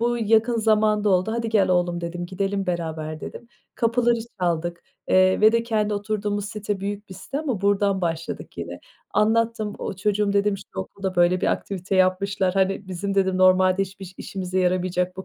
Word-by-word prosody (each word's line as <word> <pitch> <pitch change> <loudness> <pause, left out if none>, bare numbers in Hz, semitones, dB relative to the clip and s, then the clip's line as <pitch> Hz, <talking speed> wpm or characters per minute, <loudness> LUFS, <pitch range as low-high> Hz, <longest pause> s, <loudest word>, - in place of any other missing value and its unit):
Bu 240 +1 +1
yakın 225 +1 +3
zamanda 215 -1 +2
oldu, 185 +4 +2
"Hadi, 230 0 -2
gel 210 -3 +3
oğlum." 175 -1 +1
dedim, 175 +1 -4
gidelim 195 +2 -2
beraber 160 -3 -3
dedim. 235 - -9 0.3
Kapıları 235 0 +2 0.2
çaldık, 170 -1 -1 0.3
eee, 185 0 +4
ve 215 +1 +6
de 230 0 +2
kendi 215 -2 0
oturduğumuz 205 0 -2
site 205 -1 -4
büyük 205 +1 -5
bir 190 - -9
site 195 +9 -5
ama 260 -11 -2
buradan 200 -1 +2
başladık 165 -2 -4
yine. - - -6 0.3
Anlattım, 220 -1 +1
o, - - -4
"Çocuğum," 205 +1 +1
dedim, 200 0 +2
"şu - - -11 0.2
okulda, 190 - -5
böyle, 175 +1 +4
bir - - 0
aktivite 190 0 -3
yapmışlar, 185 0 +2
hani, 195 0 0
bizim 195 +2 -3
dedim 190 -1 +2
normalde 185 +1 +4
hiç 195 0 -8
biş 185 -1 -9
işimize 185 -1 -4
yaramayacak 180 0 0
bu 190 - -6
195 Hz, 175 wpm, -24 LUFS, 185-210 Hz, 0.3 s, ve